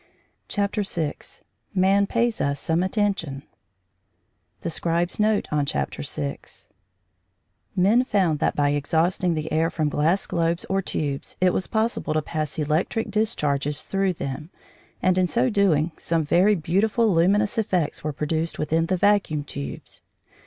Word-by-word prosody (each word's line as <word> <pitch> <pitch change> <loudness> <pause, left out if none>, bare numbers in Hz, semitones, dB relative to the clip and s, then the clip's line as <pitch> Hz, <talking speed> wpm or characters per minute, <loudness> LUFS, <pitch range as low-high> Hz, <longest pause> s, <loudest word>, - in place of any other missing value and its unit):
CHAPTER 205 +1 0
VI 165 -6 -2 0.6
MAN 195 +2 +3
PAYS 235 0 0
US 140 0 0
SOME 165 +1 0
ATTENTION 185 -8 -1 1.2
THE 170 - -3
SCRIBE'S 170 +3 -1
NOTE 210 0 +2
ON 150 -1 +1
CHAPTER 70 - -3
SIX 70 -1 -5 1.1
Men 205 +7 +4
found 185 - +1
that - - +1
by 145 -1 +2
exhausting 165 +4 +1
the 155 0 -4
air 160 +1 +2
from 155 -3 -1
glass 160 +6 +1
globes 170 0 -1
or 195 0 0
tubes 145 -6 -3
it 180 -1 +3
was 185 - -1
possible 220 -8 -1
to 155 - +2
pass 155 -1 -3
electric 160 +9 -1
discharges 150 -10 0
through 195 -1 0
them, 150 0 -5 0.5
and 185 0 +3
in 180 - +3
so 240 +5 +1
doing 175 -6 +2
some 165 -1 0
very 185 +7 +4
beautiful 205 +6 +1
luminous 200 +6 +2
effects 180 -7 -1
were 155 - -1
produced 155 +3 -2
within 160 +2 0
the 185 - +1
vacuum 195 -7 +2
tubes. 70 - -7
170 Hz, 145 wpm, -24 LUFS, 150-200 Hz, 1.2 s, Men